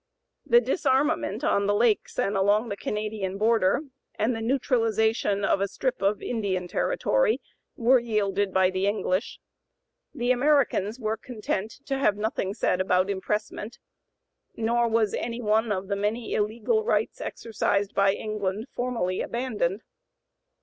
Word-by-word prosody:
The 475 - +7
disarmament 295 - 0
on 200 0 +2
the 205 - +2
lakes 225 0 +1
and 200 - 0
along 205 +4 +2
the 200 - -2
Canadian 210 -2 -3
border, 220 +1 +3 0.3
and 230 +3 0
the 225 - -4
neutralization 225 -5 +1
of 195 - +2
a 200 - +1
strip 255 +3 -3
of 200 +1 +1
Indian 195 -6 -2
territory, - - +1 0.4
were 250 +2 +4
yielded 205 -4 0
by 185 0 +3
the 185 - -2
(p. 190 - +1
095) 205 +1 +1
English. 185 +3 -2 0.8
The 245 +1 +1
Americans 255 -5 +2
were 220 -1 -1
content 220 -1 -4
to 270 -2 -2
have 210 -7 +2
nothing 210 -2 -2
said 185 -4 +1
about 185 +1 +2
impressment; 210 +3 -3 0.8
nor 235 +1 +1
was 225 -2 +1
any 235 0 -3
one 220 0 +1
of 190 -1 -2
the 200 - -1
many 210 +3 -2
illegal 230 - 0
rights 455 - 0
exercised 205 -3 -1
by 195 -1 +3
England 215 0 -3
formally 230 -7 -2
abandoned. 225 -6 -2
215 Hz, 145 wpm, -26 LUFS, 200-235 Hz, 0.8 s, The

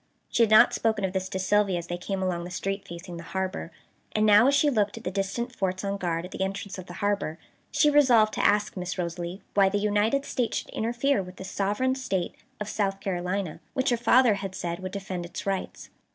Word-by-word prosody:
She - - +2
had 225 - +5
not 215 0 +7
spoken 220 -3 +1
of 190 - -3
this 190 -1 -2
to - - -3
Sylvia 195 0 +2
as 170 - -4
they 175 - -4
came 190 +2 -3
along 175 -2 -1
the 175 - -6
street 195 +2 -3
facing 170 +1 -8
the 170 - -8
harbor, 185 -2 -3 0.4
and 215 0 +2
now 210 +4 +7
as 280 - +4
she 295 - +4
looked 215 -6 +1
at 225 - -9
the 185 - -2
distant 200 +6 -2
forts 190 0 -1
on 200 0 -1
guard 170 -2 -2
at 180 - -10
the - - -6
entrance 195 +1 -3
of 185 - -9
the 175 - -8
harbor, 200 -6 0 0.3
she 300 - +3
resolved 250 -7 +5
to - - -1
ask 210 +1 +3
Miss 180 0 -4
Rosalie 175 +2 -4
why 195 -1 +5
the 205 - 0
United 210 +7 +1
States 245 -4 -1
should - - -5
interfere 240 +2 0
with 180 0 -9
the - - -8
"Sovereign 205 +7 0
State 195 -9 -2 0.3
of 210 - -4
South 195 -2 -1
Carolina," 180 -2 -2 0.2
which 260 0 +1
her - - +4
father 240 0 +5
had 195 -1 -5
said 170 0 -3
would 185 0 -5
defend 190 -3 -4
its 170 - -7
rights. 195 -1 -3
195 Hz, 230 wpm, -27 LUFS, 185-215 Hz, 0.4 s, not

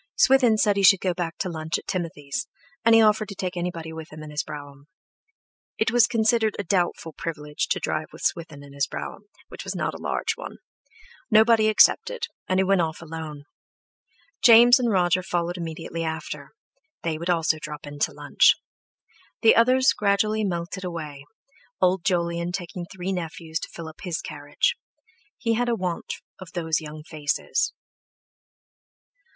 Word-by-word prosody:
Swithin 265 - +5
said 205 -1 +3
he - - +2
should 195 0 +7
go 185 -1 0
back 170 -2 -4
to 190 - -2
lunch 160 -1 -2
at - - -11
Timothy's, 160 -6 -4 0.4
and 230 0 +6
he 225 - +7
offered 215 0 +3
to 200 - -7
take 185 -1 -4
anybody 170 -2 -4
with 160 0 -9
him 155 0 -9
in 150 - -9
his 150 +1 -1
brougham. 145 -2 -10 0.9
It 220 - +1
was 240 -3 +5
considered 220 -1 +2
a 205 - -2
doubtful 175 -3 -1
privilege 150 -2 -4
to - - 0
drive 155 0 -2
with - - -11
Swithin 160 -4 -2
in 140 -1 -13
his 140 -1 0
brougham, 205 - -7 0.2
which - - -8
was - - -5
not - - -1
a - - -8
large - - -1
one; - - -8 0.7
nobody 220 0 +5
accepted, 475 - +4 0.2
and 185 0 +1
he - - +4
went 190 -1 +3
off 160 0 -3
alone. 155 -2 -7 1.0
James 240 +1 +8
and 245 -2 +1
Roger 180 -2 +3
followed 175 -1 -2
immediately 165 -1 -5
after; 160 0 -5 0.5
they 160 -2 -2
also 165 -2 +1
would - - -14
drop 150 -1 -7
in 145 0 -9
to - - +1
lunch. - - +4 0.9
The 225 - +7
others 255 +3 +5
gradually 215 +1 +1
melted 175 0 -3
away, 155 -6 -6 0.5
Old 185 -1 +2
Jolyon 170 -1 0
taking 175 -1 -5
three 190 0 -4
nephews 165 -2 -4
to - - -7
fill 165 -1 -8
up 160 - -12
his 180 -4 -3
carriage; - - -1 0.6
he 230 -1 0
had 240 +2 0
a 235 - +2
want 180 -4 -3 0.2
of 185 -3 -11
those 160 -2 0
young 155 0 -8
faces. 150 -2 -1
175 Hz, 170 wpm, -25 LUFS, 160-210 Hz, 1.0 s, James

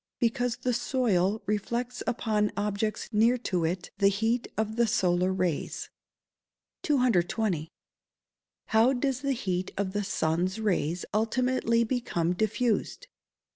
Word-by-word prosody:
_ - - -64
Because 245 0 0
the 250 - -1
soil 220 -5 +1
reflects 235 +4 -2
upon 215 -3 +1
objects 210 +1 -2
near 230 +3 +4
to 180 -8 -1
it 175 +3 -3
the 200 - +5
heat 225 +4 +1
of 220 0 -1
the 235 0 +3
solar 180 -2 +2
rays. 180 -4 -2 0.9
220. 215 - +1 1.0
_How 240 +4 +4
does 270 -1 0
the 275 -1 0
heat 185 -6 -2
of 190 -1 -1
the 205 0 -1
sun's 175 +2 0
rays 180 -5 0
ultimately 230 +1 +1
become 220 -8 -1
diffused? 220 - -1
220 Hz, 125 wpm, -28 LUFS, 185-240 Hz, 1.0 s, the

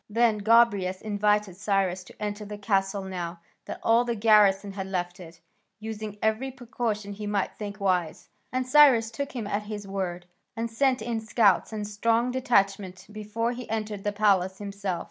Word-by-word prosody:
Then 225 0 +2
Gobryas 205 -4 +3
invited 210 -2 0
Cyrus 195 -3 0
to - - -16
enter 210 0 -4
the 210 0 -7
castle 195 -1 0
now 175 -2 -5 0.3
that - - -6
all 230 +1 +4
the 240 -1 -2
garrison 205 -2 +4
had 195 -1 -5
left 180 -1 -3
it, 165 -2 -12 0.4
using 215 -1 -6
every 220 +5 +1
precaution 230 -5 -4
he 210 +1 -6
might 205 -2 -1
think 205 0 -6
wise; 180 -4 -1 0.2
and 255 0 -1
Cyrus 255 -5 +6
took 280 +4 -5
him 240 -5 -4
at 205 +1 -1
his 210 -1 -7
word, 180 -3 -4 0.3
and 230 0 -3
sent 260 +2 +1
in 235 -1 -2
scouts 220 -3 +2
and 210 -1 -4
a - - -6
strong 230 +4 +1
detachment 200 -7 0
before 215 +2 -2
he 250 0 -7
entered 215 -2 -3
the 205 - 0
palace 195 -3 +2
himself. 200 -3 -4
210 Hz, 175 wpm, -26 LUFS, 195-225 Hz, 0.4 s, Cyrus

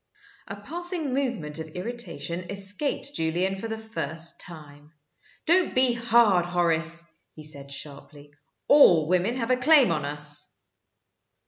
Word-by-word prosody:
A 200 - -6
passing 325 - -2
movement 235 - -2
of 160 - -6
irritation 180 -5 -5
escaped 205 +8 0
Julian 175 - -1
for 195 +4 -6
the 220 0 -5
first 170 -7 -4
time. 150 -2 -12 0.5
"Don't 355 +2 +3
be 255 -1 +4
hard, 230 -5 +3
Horace," 170 -1 0 0.3
he 155 - -11
said, 140 -2 -5
sharply. 145 +1 -10 0.3
"All 175 - +6
women 185 +7 +1
have 245 -1 -2
a 255 - +3
claim 270 - +5
on 155 -3 -1
us." 145 +1 -1
180 Hz, 130 wpm, -25 LUFS, 160-240 Hz, 0.5 s, All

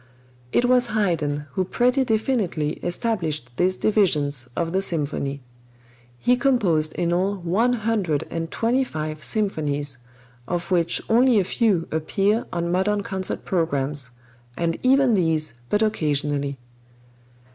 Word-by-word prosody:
It 245 - +2
was 250 0 +4
Haydn 165 -9 0
who 185 - 0
pretty 250 +7 +2
definitely 220 - 0
established 170 - -2
these 185 +1 +2
divisions 150 - +1
of 165 -1 -1
the 190 - +2
symphony. 145 -5 -1 0.7
He 245 - +3
composed 195 - +2
in 170 0 0
all 190 +3 +1
one 195 +7 +1
hundred 210 - 0
and 165 -1 -3
twenty 240 +7 +1
five 155 -8 -5
symphonies, 145 - -1 0.5
of 175 +1 -3
which 170 -2 +1
only 240 +1 +4
a - - +2
few 190 -4 +1
appear 195 +8 0
on 170 0 -2
modern 200 +3 +1
concert 190 -3 -2
programs, 145 -6 -1 0.5
and 165 -1 0
even 265 -1 +4
these 160 - +1 0.2
but 210 +1 +2
occasionally. 145 -8 -1
175 Hz, 125 wpm, -23 LUFS, 155-220 Hz, 0.7 s, was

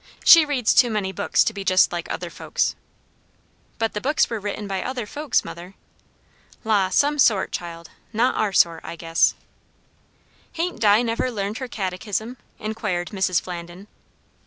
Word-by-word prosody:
She 330 -2 +9
reads 265 -6 +1
too 245 - +5
many 210 -4 -2
books 200 +1 +1
to 225 - -1
be 200 -1 -6
just 185 -1 +4
like 170 -1 -4
other - - -5
folks." - - -1 1.0
"But 225 -1 -1
the 210 - -4
books 295 0 +1
were 225 - -2
written 205 0 -5
by 195 -1 -2
other 255 -3 -4
folks, 295 +2 -1
mother." 175 +3 -9 0.9
"La! 205 -4 +2
some 290 +9 +2
sort, 215 -7 +3
child. 170 -1 -7 0.2
Not 235 +3 +2
our 215 -2 0
sort, 170 -3 +3
I - - -7
guess." 165 0 +1 1.2
"Hain't 340 -4 -3
Di 210 +1 +5
never 230 +2 -1
learned 210 -2 -4
her 260 - -5
catechism?" 210 +3 -4 0.2
inquired 200 -5 -3
Mrs. 190 -4 +1
Flandin. 175 +1 -8
210 Hz, 160 wpm, -23 LUFS, 185-240 Hz, 1.2 s, She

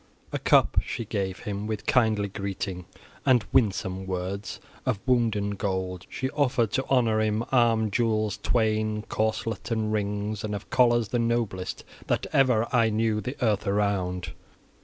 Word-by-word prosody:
XVIII - - -34
A - - -2
CUP - - +4
she 115 - -4
gave 95 -3 -3
him, 105 0 -4
with 110 -1 -4
kindly 110 -5 +3
greeting 95 -2 -4 0.4
and 125 -4 +4
winsome 95 -4 +1
words. 95 +3 -4 0.2
Of 125 -7 0
wounden 115 -5 +1
gold, 95 -2 -3
she 130 0 -3
offered, 125 -6 +1
to 130 +2 0
honor 115 -5 +3
him, 110 +1 +1
arm 115 -4 +3
jewels 110 -2 +1
twain, 110 -2 +1
corselet 110 0 -1
and 110 -2 0
rings, 105 0 -2
and 105 -1 -2
of 100 - -8
collars 120 -3 +3
the 120 - 0
noblest 115 -6 -1 0.2
that - - 0
ever 125 -4 +3
I 115 -2 +4
knew 110 0 +1
the 125 +7 -5
earth 105 -1 +1
around. 100 -3 0
110 Hz, 155 wpm, -26 LUFS, 100-115 Hz, 0.4 s, CUP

